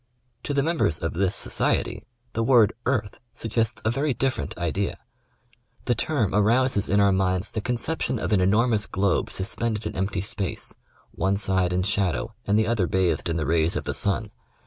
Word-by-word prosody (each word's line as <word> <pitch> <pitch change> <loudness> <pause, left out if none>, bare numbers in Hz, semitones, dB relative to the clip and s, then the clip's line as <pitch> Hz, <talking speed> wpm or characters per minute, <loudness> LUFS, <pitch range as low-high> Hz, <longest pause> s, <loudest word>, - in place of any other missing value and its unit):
To 145 - -2
the 140 - +2
members 160 - +1
of 80 -2 -3
this 95 +2 0
society - - -1 0.3
the 115 - -1
word 115 -3 +5
" - - -41
earth 115 -6 -1
" - - -46
suggests 115 -1 -1
a 110 - +3
very 140 +2 0
diffei'ent 130 +1 -2
idea. 90 +3 -1 0.9
The 120 - +2
term 120 - 0
arouses 110 +1 +2
in 100 +2 +3
our 100 -1 +5
minds 95 0 0
the 110 - -3
concep 125 +8 -2
tion 130 - 0
of 100 -1 -1
an 95 - +4
enormous 105 +3 +2
globe 95 -1 0
suspended 110 +2 -2
in - - -4
empty 95 +1 -1
space, 100 -1 -3 0.4
one 95 +3 0
side 95 -2 +1
in 90 0 +1
shadow 100 - 0
and 105 +1 +3
the 110 - +3
other 110 -5 +1
bathed 90 -2 0
in 85 - 0
the 80 - -1
rays 80 +2 +1
of - - -2
the - - -3
sun. 105 +1 -1
100 Hz, 190 wpm, -25 LUFS, 95-115 Hz, 0.9 s, word